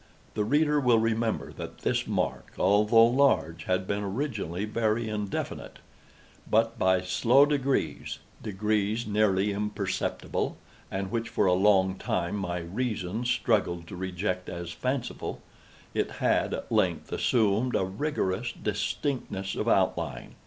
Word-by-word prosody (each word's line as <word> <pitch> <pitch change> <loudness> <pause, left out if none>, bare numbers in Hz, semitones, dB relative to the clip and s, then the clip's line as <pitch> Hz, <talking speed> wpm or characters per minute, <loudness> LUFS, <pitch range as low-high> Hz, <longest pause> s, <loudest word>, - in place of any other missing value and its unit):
The 105 - 0
reader 150 +5 +3
will 125 -4 +4
remember 115 0 0
that - - -8
this - - 0
mark, - - -2
although 105 +4 +5
large, 120 - +2
had 95 0 0
been 100 +2 -1
originally 105 - -2
very 110 +1 0
indefinite; 105 -2 -4 0.7
but, 115 +1 +2
by 95 -1 +3
slow 120 +9 +4
degrees—degrees 110 -6 -1
nearly 105 -1 +2
imperceptible, 100 -1 -2 0.3
and 95 0 -3
which 115 0 -2
for 115 -3 +1
a 90 - +4
long 95 0 +3
time 85 +1 -1
my 90 -3 -2
reason 105 +2 -3
struggled 100 -8 +1
to - - -7
reject 90 0 -3
as 85 0 -5
fanciful—it 130 +5 -4
had, - - +1
at - - -8
length, - - +1
assumed 115 +2 +2
a 95 - +2
rigorous 110 0 -2
distinctness 105 -2 -2
of - - -3
outline. - - 0
105 Hz, 125 wpm, -28 LUFS, 95-115 Hz, 0.7 s, although